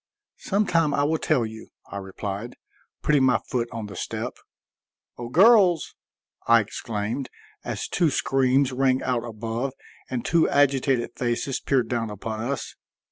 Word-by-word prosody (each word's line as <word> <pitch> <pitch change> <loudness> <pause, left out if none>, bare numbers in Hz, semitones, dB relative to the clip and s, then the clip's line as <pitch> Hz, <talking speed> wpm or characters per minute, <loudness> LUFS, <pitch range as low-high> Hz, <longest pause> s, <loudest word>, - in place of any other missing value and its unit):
"Some 205 +2 0
time 165 -5 +2
I 145 - +2
will 155 +2 +1
tell 135 -7 +1
you," 110 0 -9 0.2
I 100 - -5
replied, 100 +3 -5 0.5
putting 145 -3 +3
my 130 -1 +4
foot 120 -2 -2
on 115 -3 -5
the 105 - -9
step. - - -4 0.9
"O 120 -1 -5
girls!" 185 - +5 0.5
I 115 0 +7
exclaimed, 110 +3 -3 0.3
as - - -4
two 170 -3 +2
screams 135 -1 +2
rang 130 0 +1
out 125 -2 0
above 115 +3 -4 0.4
and 125 -2 -3
two 165 -1 +3
agitated 135 -3 +2
faces 120 +2 -1
peered 135 -3 +1
down 115 -3 -2
upon 110 +1 -5
us. 130 +5 -3
125 Hz, 145 wpm, -25 LUFS, 115-140 Hz, 0.9 s, I